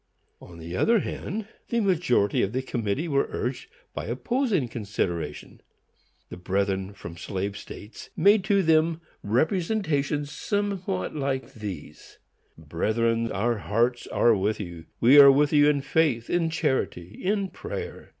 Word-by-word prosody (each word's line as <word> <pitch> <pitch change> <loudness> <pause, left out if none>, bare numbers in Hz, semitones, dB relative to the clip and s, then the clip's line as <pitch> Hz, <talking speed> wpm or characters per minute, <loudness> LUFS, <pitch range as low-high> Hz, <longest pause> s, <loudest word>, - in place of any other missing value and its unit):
On 85 - -12
the 85 +2 -7
other 225 - +3
hand, 215 +1 -5 0.2
the 235 - +1
majority 170 - +2
of 100 - -1
the 130 +1 -1
committee 120 +5 -2
were 140 -3 +1
urged 125 +2 -4 0.2
by - - -5
opposing 235 - 0
considerations. 90 -9 -4 0.7
The - - -8
brethren 95 +1 -1
from 85 -4 -9
slave 100 +2 -4
states 105 +2 -10
made 200 +4 +5
to 200 -1 +3
them 160 0 +3 0.2
representations 150 - 0
somewhat 195 - -2
like 135 -2 -2
these: 95 -9 -8 0.4
"Brethren, 115 +9 0
our 115 +3 0
hearts 120 +4 0
are 115 -2 +3
with 105 +2 -1
you. 85 -5 -7
We 130 +5 +7
are 140 -1 +10
with 145 +2 +2
you 145 0 +6
in 145 -2 +1
faith, 135 -5 +1
in 170 -2 +1
charity, 130 - -2
in 200 0 0
prayer. 460 - -7
130 Hz, 140 wpm, -26 LUFS, 100-165 Hz, 0.7 s, are